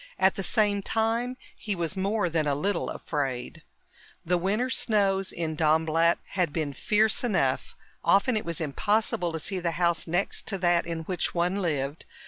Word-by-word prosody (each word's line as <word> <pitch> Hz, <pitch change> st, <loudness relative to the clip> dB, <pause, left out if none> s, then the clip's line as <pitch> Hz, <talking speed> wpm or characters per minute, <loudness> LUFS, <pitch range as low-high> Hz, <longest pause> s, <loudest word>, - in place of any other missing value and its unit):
At 190 Hz, 0 st, +4 dB
the 200 Hz, -, -4 dB
same 205 Hz, 0 st, +2 dB
time, 230 Hz, +4 st, 0 dB, 0.2 s
he 205 Hz, -2 st, -3 dB
was 170 Hz, 0 st, -3 dB
more 200 Hz, +1 st, 0 dB
than 160 Hz, -2 st, 0 dB
a 140 Hz, -, +1 dB
little 185 Hz, +5 st, -1 dB
afraid. 135 Hz, -5 st, -3 dB, 0.6 s
The 180 Hz, +2 st, +2 dB
winter 210 Hz, +8 st, 0 dB
snows 195 Hz, -5 st, +1 dB
in 160 Hz, -2 st, -3 dB
Dornblatt 160 Hz, +2 st, +3 dB
had 180 Hz, -5 st, 0 dB
been 150 Hz, -2 st, -2 dB
fierce 215 Hz, -, +2 dB
enough; 240 Hz, -3 st, 0 dB, 0.3 s
often 200 Hz, +5 st, +3 dB
it 215 Hz, -, -1 dB
was 170 Hz, +1 st, -3 dB
impossible 180 Hz, +3 st, 0 dB
to 160 Hz, -, -4 dB
see 185 Hz, +4 st, -2 dB
the 170 Hz, -1 st, -1 dB
house 170 Hz, -1 st, +1 dB
next 175 Hz, +4 st, -1 dB
to 195 Hz, -, -1 dB
that 175 Hz, -2 st, +2 dB
in 165 Hz, -1 st, -3 dB
which 180 Hz, +2 st, -3 dB
one 180 Hz, +4 st, +1 dB
lived. 145 Hz, -3 st, -2 dB
180 Hz, 170 wpm, -27 LUFS, 160-205 Hz, 0.6 s, At